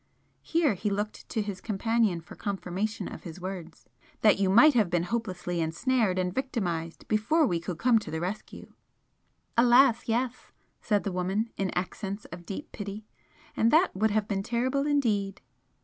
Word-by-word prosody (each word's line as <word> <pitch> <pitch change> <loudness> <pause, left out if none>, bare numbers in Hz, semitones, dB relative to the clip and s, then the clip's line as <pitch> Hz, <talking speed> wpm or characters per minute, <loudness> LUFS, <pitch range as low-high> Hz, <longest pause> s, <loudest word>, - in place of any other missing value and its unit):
here 325 -7 +2
he 210 +3 -2
looked 205 +1 -4
to 220 - -1
his 200 -3 -6
companion 220 -3 +1
for 165 - -13
confirmation 200 +1 -3
of - - -8
his 170 0 -9
words 180 -3 -7 0.4
"that 210 -3 +5
you 195 -1 +2
might 240 +10 +7
have 220 -7 +3
been 175 -1 +1
hopelessly 180 -5 -2
ensnared 190 +5 +1
and 180 -1 0
victimised 180 -11 -3
before 235 +10 +2
we 175 -9 0
could 175 0 -5
come 235 +3 +4
to - - -9
the 160 - -3
rescue." 185 +5 -6 0.8
"Alas, 240 0 +5
yes!" 245 +2 -2 0.3
said 205 -3 +1
the 200 - -2
woman, 190 +5 -1
in 195 -1 -1
accents 195 +3 -4
of 175 0 -9
deep 290 +11 -6
pity; 205 +1 -6 0.5
"And 225 - +3
that 325 - +4
would 215 +3 +2
have 210 0 0
been 195 -2 -1
terrible 255 +6 0
indeed!" 215 -9 +1
210 Hz, 165 wpm, -28 LUFS, 185-235 Hz, 0.8 s, might